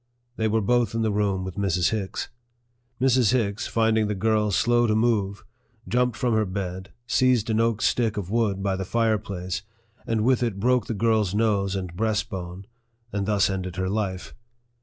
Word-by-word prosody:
They 110 -2 0
were 110 +1 +1
both 120 0 +1
in 115 - 0
the 110 - +1
room 100 -2 0
with 95 +1 -7
Mrs. 90 -3 +1
Hicks. 105 -4 -3 0.7
Mrs. 130 -3 +3
Hicks, 105 -4 0
finding 110 -1 +2
the 105 - -2
girl 105 +1 +1
slow 120 +4 +2
to 110 - +2
move, 105 -4 0 0.4
jumped 125 -2 +1
from 125 -2 0
her 110 0 +3
bed, 95 0 -5
seized 120 -3 +2
an 110 - +1
oak 115 -1 +1
stick 115 -4 +1
of 95 -2 -4
wood 105 -4 0
by 100 -1 0
the 95 - -3
fireplace, 100 -5 -1 0.5
and 115 -1 0
with 130 -1 +3
it 115 -5 -1
broke 125 +1 +2
the 115 - -2
girl's 110 -3 +1
nose 100 -3 +1
and 90 -3 -5
breastbone, 95 -3 -3 0.5
and 100 -1 -2
thus 105 -2 +3
ended 95 -2 -4
her 95 0 -1
life. 95 -3 -3
105 Hz, 180 wpm, -25 LUFS, 95-115 Hz, 0.7 s, Mrs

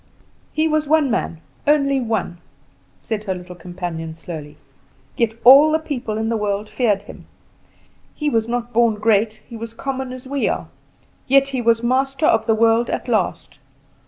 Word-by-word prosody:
"He 310 +1 +1
was 310 -1 0
one 300 -3 +3
man, 165 -6 -2 0.3
only 275 -2 +3
one," 220 -7 -2 0.6
said 215 -2 -4
her 190 -2 -2
little 180 0 -9
companion 175 -2 -6
slowly, 155 -3 -9 0.6
"yet 225 -2 0
all 280 +5 +8
the 315 - +3
people 260 -9 -4
in 220 0 -1
the 230 - 0
world 205 0 -2
feared 210 -6 +1
him. - - -13 0.9
He 300 - -3
was 225 -5 +1
not 240 0 -3
born 230 -1 +3
great, 215 0 +1
he 235 - -10
was 225 0 -7
common 265 0 -4
as 255 0 -9
we 275 +1 -1
are; - - -3 0.6
yet 275 +1 +4
he 260 -2 -2
was 230 0 +2
master 270 +4 +1
of 225 -6 +3
the 225 - +3
world 230 +1 +3
at - - -3
last. 210 - -1
230 Hz, 170 wpm, -20 LUFS, 210-270 Hz, 0.9 s, all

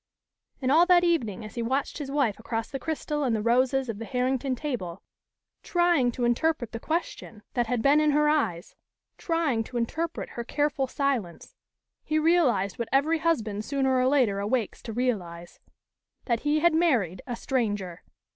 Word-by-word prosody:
And 255 - +2
all 335 +4 +5
that 355 -1 +5
evening 235 - 0
as 215 - -10
he 235 - -3
watched 265 +6 -2
his 285 -2 -5
wife 275 -8 0
across 225 0 -4
the 270 - -4
crystal 300 0 -3
and 245 -4 +1
the 215 - -1
roses 255 +3 +2
of 220 -3 -5
the 230 - -5
Herrington 255 +1 -1
table, 235 - -5 0.6
trying 345 -8 +2
to 245 - -1
interpret 240 0 0
the 230 - -5
question 310 -8 -4
that 240 -2 0
had 240 -1 -1
been 290 +2 +5
in 305 - +3
her 300 +1 +3
eyes, 220 - 0 0.5
trying 320 -9 0
to 245 - -6
interpret 320 +8 -3
her 235 - -6
careful 285 +1 0
silence, 255 -11 -2 0.5
he 310 - -1
realized 290 - +2
what 235 -1 -3
every 300 +5 +2
husband 220 -11 0
sooner 265 +1 0
or 255 0 +3
later 250 -8 +2
awakes 215 +2 -1
to 225 - -7
realize 190 -8 -3 0.7
that 235 -3 0
he 295 +3 +1
had 345 0 +4
married 245 - +1
a 245 - -3
stranger. 205 -9 -2
255 Hz, 175 wpm, -27 LUFS, 225-300 Hz, 0.7 s, all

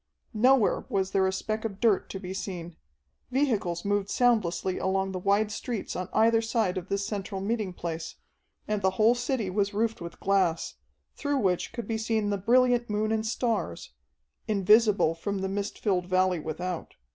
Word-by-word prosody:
Nowhere 245 +1 +3
was 190 -1 0
there 190 -1 +3
a - - +1
speck 215 +3 -3
of 200 -3 -4
dirt 220 -5 +2
to 195 - -5
be 185 -1 -6
seen. 175 -4 -6 0.5
Vehicles 220 -11 0
moved 205 0 0
soundlessly 190 -7 +1
along 190 0 0
the 185 - -4
wide 200 +3 +2
streets 225 0 -4
on 180 - -4
either 225 +1 +4
side 225 -4 0
of 185 0 -5
this 200 0 -1
central 200 -1 -4
meeting 210 0 -1
place, 170 -2 -5 0.5
and 210 -1 -1
the 190 - +3
whole 220 +2 +5
city 245 -5 -2
was 200 +1 0
roofed 225 -1 0
with 170 0 -8
glass, 185 -4 +1 0.4
through 285 -1 -1
which 185 -7 0
could 235 0 -6
be 225 -1 -1
seen 220 -2 0
the 200 - 0
brilliant 245 +3 +3
moon 210 +1 0
and 220 0 0
stars 220 - -2 0.5
invisible 210 -3 +4
from 195 +4 -3
the 190 - -1
mist 200 +1 -3
filled 185 -4 0
valley 185 -1 +2
without. 165 +3 -5
200 Hz, 175 wpm, -28 LUFS, 185-225 Hz, 0.5 s, whole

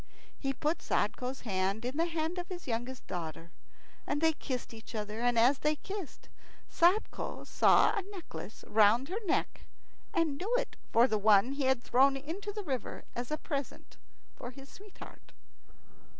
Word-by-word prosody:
He 270 - -2
put 300 +5 -1
Sadko's 255 +2 -1
hand 195 +1 -1
in 255 +3 -3
the 330 +2 +2
hand 330 +1 -2
of 350 - -5
his 355 -2 -7
youngest 245 +2 -3
daughter, 165 -2 -6 0.6
and 290 - 0
they 320 +1 +4
kissed 255 -5 -5
each 225 +1 -10
other. 210 +1 -3
And 245 -1 +2
as 250 +4 +5
they 300 0 +2
kissed, 385 0 -7 0.4
Sadko 365 +6 +1
saw - - +5
a 405 - 0
necklace 335 - -9
round 220 +6 +4
her 425 +5 -3
neck, - - -1 0.4
and 330 -8 0
knew 405 +6 -3
it - - -1 0.2
for 230 +1 +6
one 215 +1 +4
he 280 -1 -1
had 260 -2 +2
thrown 270 +2 +4
into 340 +9 -5
the 420 0 -5
river 265 -8 -4
as 240 0 -4
a 305 - -1
present 280 -4 -5 0.4
for 245 - -7
his 270 +2 -12
sweetheart. 410 0 -13
270 Hz, 165 wpm, -32 LUFS, 230-330 Hz, 0.6 s, for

